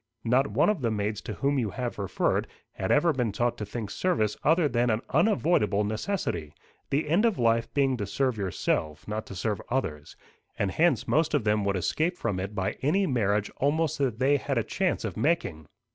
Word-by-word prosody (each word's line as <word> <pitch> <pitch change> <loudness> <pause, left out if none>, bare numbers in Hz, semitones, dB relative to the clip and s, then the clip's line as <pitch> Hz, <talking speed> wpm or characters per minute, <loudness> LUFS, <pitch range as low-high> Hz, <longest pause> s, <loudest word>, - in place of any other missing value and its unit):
Not 125 +4 +3
one 130 - +3
of 195 -9 -4
the 120 - +1
maids 105 -1 -2
to 110 - -6
whom 140 +6 0
you 115 -4 0
have 120 +2 -4
referred 100 -2 0 0.2
had 95 - -4
ever 160 +3 +4
been 125 -5 0
taught 120 +4 0
to 105 - -4
think 105 -1 -5
service 110 - 0
other 160 +1 +4
than 120 -2 +1
an 110 0 +1
unavoidable 160 - +2
necessity, 105 - -3 0.3
the 150 +3 0
end 170 +8 +3
of 230 -5 +2
life 115 -1 +2
being 135 -3 +2
to 100 -3 -3
serve 130 +4 0
yourself, 80 -6 -2
not 105 +1 -4
to 95 - -8
serve 105 +1 -2
others; 80 - -3 0.4
and 100 -2 0
hence 170 - +2
most 155 0 +2
of 140 - +1
them 105 -1 +2
would 100 0 +1
escape 160 - 0
from 105 -5 -2
it 100 +3 -5
by 95 -2 -2
any 190 +9 +2
marriage 105 - 0
almost 155 +2 +1
that 130 -6 0
they 135 +3 +3
had 135 -1 -2
a 115 - +2
chance 185 - -1
of - - -4
making. 90 - 0
120 Hz, 205 wpm, -27 LUFS, 105-145 Hz, 0.4 s, ever